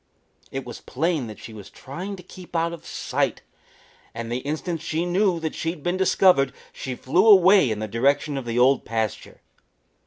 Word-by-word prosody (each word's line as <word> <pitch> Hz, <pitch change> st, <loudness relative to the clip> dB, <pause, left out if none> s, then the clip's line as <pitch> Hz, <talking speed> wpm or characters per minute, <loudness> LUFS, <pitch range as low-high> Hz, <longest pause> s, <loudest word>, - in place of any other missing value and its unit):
It 135 Hz, +3 st, -5 dB
was 120 Hz, -, -9 dB
plain 155 Hz, -2 st, -1 dB
that 110 Hz, -, -9 dB
she 110 Hz, -, -10 dB
was 105 Hz, -3 st, -10 dB
trying 180 Hz, +9 st, -7 dB
to 180 Hz, -, -12 dB
keep 180 Hz, 0 st, -13 dB
out 165 Hz, +1 st, +1 dB
of 170 Hz, -, -10 dB
sight, -, -, -2 dB, 0.7 s
and 115 Hz, 0 st, -5 dB
the 120 Hz, -, -1 dB
instant 155 Hz, +4 st, -3 dB
she 165 Hz, +1 st, -2 dB
knew 180 Hz, 0 st, +2 dB
that 160 Hz, -1 st, -3 dB
she 165 Hz, -, -2 dB
had 165 Hz, -4 st, -6 dB
been 175 Hz, +1 st, 0 dB
discovered 185 Hz, -7 st, +4 dB, 0.2 s
she 130 Hz, -2 st, -5 dB
flew 175 Hz, -, +2 dB
away 190 Hz, -, +7 dB
in 110 Hz, -, -1 dB
the 110 Hz, +1 st, -4 dB
direction 140 Hz, +6 st, +1 dB
of 135 Hz, -2 st, -4 dB
the 115 Hz, 0 st, -3 dB
Old 130 Hz, +2 st, +4 dB
Pasture. 110 Hz, -2 st, -4 dB
150 Hz, 190 wpm, -24 LUFS, 125-175 Hz, 0.7 s, away